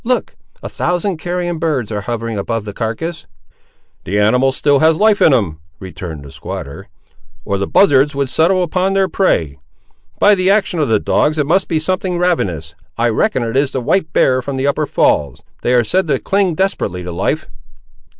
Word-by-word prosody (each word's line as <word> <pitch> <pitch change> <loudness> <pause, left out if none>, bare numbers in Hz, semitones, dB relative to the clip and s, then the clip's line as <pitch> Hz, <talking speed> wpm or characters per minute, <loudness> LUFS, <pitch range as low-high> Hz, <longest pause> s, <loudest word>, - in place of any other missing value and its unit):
Look! 250 +1 -1 0.3
a - - -4
thousand 180 +1 -2
carrion 175 0 -3
birds, 140 -10 -1
ar' 105 -1 -3
hovering 115 +1 -4
above 110 +2 -3
the 105 - -6
carcass." 155 - -4 0.8
"The 100 +4 -2
animal 125 +6 +3
has 135 - 0
still 145 -1 +3
life 200 +8 +3
in - - +6
him," 100 - 0 0.2
returned 85 -5 -8
the 70 - -11
squatter, 70 0 -8 0.6
"or 100 -1 -1
the 100 - -2
buzzards 145 -6 +3
would 140 -1 0
settle 170 +7 +2
upon 185 +3 0
their 195 -1 +2
prey! 80 - 0 0.6
By 205 - +5
the 185 -1 +1
action 195 -4 +1
of 145 -5 0
the 110 - +3
dogs 155 +1 +1
it 150 - +1
must 190 +6 +1
be 165 - 0
something 185 +2 -1
ravenous; 90 - -1 0.2
I 120 +1 +2
reckon 130 - 0
it 115 +1 -4
is 140 0 +2
the 130 - -1
white 160 +5 0
bear 130 -4 +2
from 135 +1 -5
the 130 - -1
upper 145 +1 0
falls. 70 - +1 0.2
They 125 - +1
are 120 - +4
said 185 +8 0
to 140 -3 +1
cling 195 +2 0
desperately 155 - -2
to 90 - -6
life!" 85 - -2
140 Hz, 190 wpm, -16 LUFS, 110-180 Hz, 0.8 s, in